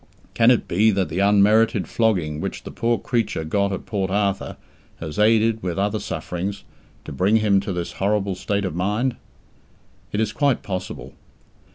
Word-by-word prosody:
Can 115 Hz, 0 st, +4 dB
it 125 Hz, -, +3 dB
be 105 Hz, +6 st, +3 dB
that 95 Hz, -5 st, 0 dB
the 85 Hz, +4 st, -3 dB
unmerited 105 Hz, -1 st, +4 dB
flogging 90 Hz, -10 st, 0 dB
which -, -, -5 dB
the -, -, -8 dB
poor 115 Hz, 0 st, 0 dB
creature 115 Hz, -9 st, -1 dB
got 100 Hz, +5 st, 0 dB
at 95 Hz, -, -5 dB
Port 95 Hz, -3 st, -2 dB
Arthur 100 Hz, 0 st, -1 dB, 0.4 s
has 80 Hz, +3 st, -6 dB
aided, 110 Hz, +1 st, +3 dB
with 90 Hz, -1 st, -3 dB
other 100 Hz, +2 st, 0 dB
sufferings, 90 Hz, +4 st, -4 dB, 0.4 s
to -, -, -7 dB
bring 95 Hz, +10 st, +2 dB
him 105 Hz, -3 st, +3 dB
to 100 Hz, +1 st, -4 dB
this 90 Hz, -2 st, -3 dB
horrible 100 Hz, 0 st, 0 dB
state 100 Hz, +2 st, -2 dB
of 90 Hz, -, -3 dB
mind? 105 Hz, +8 st, 0 dB, 1.0 s
It 105 Hz, -, -2 dB
is 110 Hz, -1 st, 0 dB
quite 140 Hz, -3 st, +1 dB
possible. 95 Hz, -2 st, -5 dB
100 Hz, 170 wpm, -22 LUFS, 95-110 Hz, 1.0 s, Can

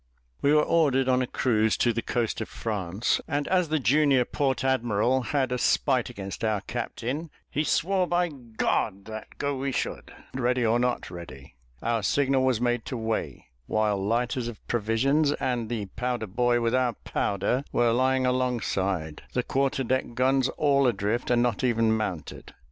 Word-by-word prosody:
We 140 Hz, -, +3 dB
were 150 Hz, 0 st, +5 dB
ordered 140 Hz, -6 st, +2 dB
on 130 Hz, 0 st, +3 dB
a 130 Hz, -, -1 dB
cruise 110 Hz, -4 st, +1 dB
to 120 Hz, -, +2 dB
the 115 Hz, -, -1 dB
coast 115 Hz, -1 st, -1 dB
of 110 Hz, -, -5 dB
France; 105 Hz, 0 st, -1 dB
and 145 Hz, -2 st, -1 dB
as 180 Hz, -3 st, +2 dB
the 155 Hz, -, +2 dB
junior 140 Hz, -1 st, +3 dB
port 135 Hz, -1 st, -1 dB
admiral 130 Hz, -1 st, +1 dB
had 130 Hz, 0 st, -1 dB
a 125 Hz, -, -1 dB
spite 130 Hz, -1 st, +2 dB
against 100 Hz, -4 st, -7 dB
our 110 Hz, -2 st, +1 dB
captain, 125 Hz, +7 st, -4 dB, 0.2 s
he 150 Hz, -, 0 dB
swore 185 Hz, +4 st, +1 dB
by 175 Hz, -1 st, +1 dB, 0.3 s
that 110 Hz, +3 st, -1 dB
go 140 Hz, -1 st, -1 dB
we 135 Hz, +1 st, -2 dB
should, -, -, -3 dB, 0.2 s
ready 125 Hz, -1 st, +1 dB
or 115 Hz, +2 st, +3 dB
not 125 Hz, -6 st, -1 dB
ready. 70 Hz, -8 st, -10 dB, 0.3 s
Our 115 Hz, -1 st, +1 dB
signal 135 Hz, +5 st, +2 dB
was 130 Hz, -4 st, +2 dB
made 120 Hz, -1 st, 0 dB
to 130 Hz, -, -4 dB
weigh, 110 Hz, -1 st, -3 dB, 0.2 s
while 105 Hz, -2 st, +1 dB
lighters 120 Hz, +3 st, 0 dB
of 120 Hz, -2 st, -9 dB
provisions, 130 Hz, +7 st, +2 dB
and 120 Hz, -6 st, -2 dB
the 115 Hz, -4 st, -2 dB
powder 120 Hz, +3 st, -3 dB
boy 120 Hz, +4 st, +1 dB
with 115 Hz, 0 st, +1 dB
our 125 Hz, -2 st, +2 dB
powder, 105 Hz, +5 st, -1 dB
were 120 Hz, -1 st, +3 dB
lying 130 Hz, +1 st, +2 dB
alongside 100 Hz, -10 st, -1 dB
the 125 Hz, -, 0 dB
quarter 135 Hz, +1 st, 0 dB
deck 130 Hz, -1 st, -1 dB
guns 130 Hz, +1 st, +2 dB
all 140 Hz, -2 st, +3 dB
adrift, 110 Hz, +1 st, -1 dB
and 120 Hz, -1 st, +3 dB
not 120 Hz, 0 st, -1 dB
even 115 Hz, -3 st, +2 dB
mounted. 100 Hz, -7 st, -5 dB
125 Hz, 170 wpm, -26 LUFS, 110-130 Hz, 0.3 s, were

